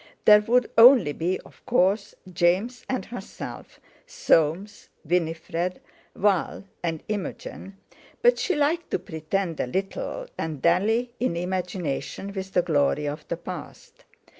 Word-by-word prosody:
There 210 0 +8
would 240 +3 +2
only 235 - +8
be, 175 +5 -1
of - - -19
course, 200 -2 +2 0.2
James 190 +9 +1
and 255 - -2
herself, 235 -5 -9 0.3
Soames, 205 - +1 0.2
Winifred, 170 +2 -1 0.4
Val, 200 -1 +1 0.2
and 165 -2 -3
Imogen—but 205 - -3
she 375 - 0
liked 305 +4 0
to - - 0
pretend 170 0 -3
a - - 0
little 195 - -3
and 160 -3 -3
dally 220 - +2
in 240 -9 0
imagination 180 0 -3
with 190 -1 -6
the 180 - +3
glory 150 -2 +1
of 150 +1 -5
the 170 - -3
past. 175 -2 -10
185 Hz, 125 wpm, -25 LUFS, 165-225 Hz, 0.4 s, There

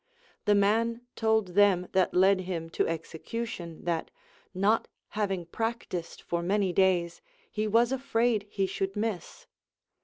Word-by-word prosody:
The 210 - +4
man 225 +4 +2
told 220 -3 +2
them 185 -1 +4
that 185 -1 +2
led 190 +1 +5
him 170 -3 -4
to - - +1
execution 170 +2 -5
that, 170 -2 -1 0.4
not 200 +4 +2 0.2
having 195 -4 -2
practised 225 -3 -4
for 170 0 -2
many 190 +1 +1
days, 175 -3 +2 0.3
he 215 0 -1
was 230 +3 +3
afraid 235 -5 +1
he 195 -1 0
should 195 +1 -3
miss. 220 - -4
195 Hz, 130 wpm, -29 LUFS, 180-220 Hz, 0.4 s, led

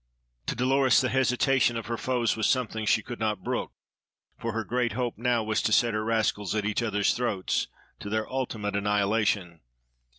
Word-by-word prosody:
To - - -1
Dolores, 130 +2 +3
the 130 - +1
hesitation 130 -1 +2
of 115 - -5
her 115 - -2
foes 120 -1 0
was 110 -1 +1
something 110 -4 -1
she 110 - +3
could 120 - -7
not 105 -4 -1
brook, - - -2 0.6
for 115 - -4
her 115 0 -2
great 120 +3 -1
hope 125 -2 -2
now 120 0 +1
was 110 +1 0
to - - 0
set 115 +1 +3
her 110 0 -1
rascals 110 -2 0
at 105 -1 -1
each 110 +2 0
other's 105 -3 +1
throats 115 -6 -1 0.3
to 100 - -6
their 110 +1 -1
ultimate 110 -6 -3
annihilation. 100 -3 0
115 Hz, 185 wpm, -27 LUFS, 105-125 Hz, 0.6 s, Dolores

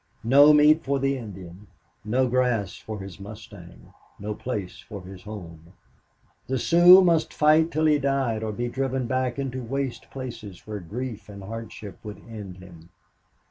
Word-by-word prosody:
No 140 +6 +7
meat 150 +1 +5
for 140 +1 0
the 135 0 0
Indian 95 -5 -9 0.4
no 125 +5 +1
grass 125 -4 0
for 110 -2 -7
his 95 0 -9
mustang 100 -3 -12 0.2
no 105 +1 -4
place 105 -5 -5
for 100 -4 -9
his 95 0 -11
home. 85 -5 -10 0.7
The 130 - -1
Sioux 175 +7 +7
must 170 -3 +2
fight 155 +2 +4
till 155 0 0
he 150 -1 +4
died 135 -5 0
or 110 -1 -2
be 120 +3 -3
driven 130 +1 -2
back 130 +1 -1
into 130 -2 -3
waste 135 +1 -4
places 120 -8 -8
where 105 -1 -5
grief 110 +5 -6
and 100 -1 -9
hardship 110 -1 -8
would 105 -1 -7
end 105 -5 -8
him. 85 -3 -14
115 Hz, 160 wpm, -25 LUFS, 100-135 Hz, 0.7 s, No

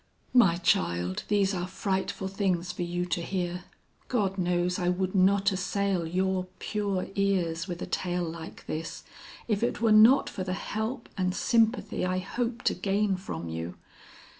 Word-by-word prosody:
"My 195 -9 +6
child, 90 - 0
these 200 -1 +2
are 180 -1 -2
frightful 190 0 -2
things 185 -3 -1
for 180 - -6
you 175 0 -1
to 175 -1 -1
hear. 180 0 -3 0.4
God 200 -6 0
knows 180 +1 +1
I 175 -1 +1
would 185 +1 0
not 200 +1 +4
assail 190 -1 0
your 185 +2 0
pure 200 -3 -2
ears 185 -4 0
with 175 -1 -4
a - - -2
tale 180 -1 -1
like 165 0 -8
this, 160 +1 -5 0.4
if 210 -3 0
it 235 - 0
were 230 -2 +3
not 220 +6 +7
for 185 - -4
the 185 0 -2
help 220 +6 -3
and 185 0 +1
sympathy 230 0 +2
I 185 0 0
hope 230 +6 -3
to - - +3
gain 195 +2 +1
from 85 - -6
you. 80 +2 -5
185 Hz, 165 wpm, -28 LUFS, 175-200 Hz, 0.4 s, not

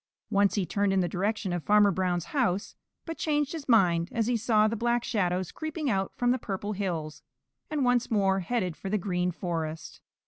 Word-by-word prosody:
Once 200 0 +3
he 200 -3 0
turned 200 +4 0
in 195 - +2
the 175 - 0
direction 195 +1 -1
of 175 - -2
Farmer 210 -1 +5
Brown's 180 -2 -1
house, 215 -9 0 0.3
but 330 -1 -6
changed 295 -2 0
his 315 -5 -7
mind 175 -7 +4
as 230 -1 0
he 245 +1 +1
saw 215 -2 +3
the 225 - -1
Black 240 +1 0
Shadows 185 -5 -1
creeping 310 -3 -3
out 195 -1 -1
from 245 0 +2
the 255 - +1
Purple 205 -1 -4
Hills, 165 -7 -3 0.5
and 300 -4 0
once 245 -1 +2
more 195 -4 +2
headed 185 -3 -2
for 195 - -6
the 210 - +1
Green 180 -2 -1
Forest. 165 -3 -4
200 Hz, 200 wpm, -28 LUFS, 180-235 Hz, 0.5 s, Farmer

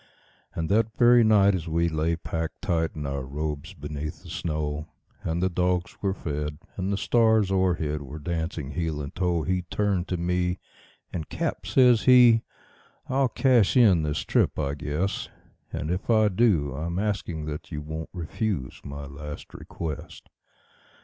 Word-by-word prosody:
And 80 -1 -2
that 110 +2 +1
very 120 -1 +6
night, 100 -2 +5
as 90 -3 -3
we 85 +1 +1
lay 80 +1 0
packed 80 +2 -5
tight 80 -5 0
in 75 -2 -4
our 70 0 -2
robes 75 +2 -4
beneath 75 +2 -6
the 85 - -10
snow, 75 -3 -3 0.3
And 85 +2 -1
the - - +4
dogs 90 0 0
were 95 -1 0
fed, 75 -3 -4 0.2
and 95 +1 -2
the 100 - 0
stars 110 -3 +3
o'erhead 85 -6 +1
were 75 +2 -8
dancing 80 -2 -3
heel 80 -3 -2
and 70 -1 -5
toe, 90 -2 0
He 95 +2 0
turned 100 -4 0
to 90 - -1
me, 90 +1 0 0.6
and 80 -3 -4
"Cap," - - -3
says 125 -4 +5
he, 125 -3 +7 0.7
"I'll 135 0 +2
cash 125 -4 +3
in 100 -9 +6
this 75 -1 -1
trip, - - +2
I 70 - -1
guess; 75 +7 -2 0.4
And 75 - -3
if 90 +5 -3
I 110 -2 +5
do, 90 - +2
I'm 85 +5 -3
asking 95 -6 -2
that 75 +2 -6
you 75 -2 -4
won't 80 +1 -6
refuse 90 - -3
my 70 0 -7
last 70 +2 -8
request." 80 -4 -7
85 Hz, 165 wpm, -26 LUFS, 75-100 Hz, 0.7 s, he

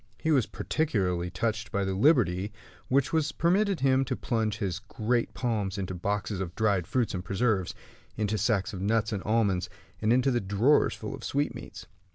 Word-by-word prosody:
He 160 - 0
was 135 -8 +3
particularly 95 - -1
touched 110 +4 -2
by 100 -3 0
the 95 - -1
liberty 100 - +3 0.4
which 135 +3 +1
was 155 -1 +2
permitted 190 +4 +1
him 135 0 +4
to - - -2
plunge 110 -2 -1
his 95 -3 -2
great 115 +2 -1
palms 105 -5 -1
into 95 -2 -3
the 90 - -7
boxes 100 +1 -2
of 90 -2 -5
dried 100 -6 +1
fruits 125 -3 0
and 90 -1 -3
preserves, 100 -1 0 0.4
into 105 -1 0
the 110 - 0
sacks 105 -2 +1
of 95 - -5
nuts 110 +2 +1
and 100 - -2
almonds, 100 -4 +1 0.3
and 110 +1 +2
into 130 +2 +3
the 120 - +1
drawers 105 +9 +3
full - - -6
of - - -9
sweetmeats. 140 -4 -3
110 Hz, 190 wpm, -28 LUFS, 95-125 Hz, 0.4 s, him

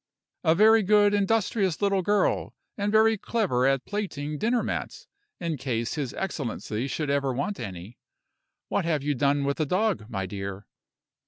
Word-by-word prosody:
"A 160 -1 +4
very 220 +3 +6
good, 205 +1 +4
industrious 200 -3 +1
little 200 -1 +2
girl; 205 +3 +1 0.2
and 205 0 -1
very 220 0 +4
clever 180 - +1
at 135 -1 +1
plaiting 155 -8 -4
dinner 235 +2 +1
mats, - - -4 0.3
in 165 -3 -2
case 120 -3 -2
his 140 -5 -3
excellency 130 - -3
should 145 +1 -2
ever 140 -1 +1
want 185 +11 -3
any. 100 +1 -8 0.7
What 200 - 0
have 155 -4 0
you 145 0 +1
done 140 +1 +1
with 140 0 -1
the 155 - 0
dog, 185 - 0
my 95 -4 -3
dear?" 100 +1 -6
155 Hz, 160 wpm, -26 LUFS, 130-205 Hz, 0.7 s, very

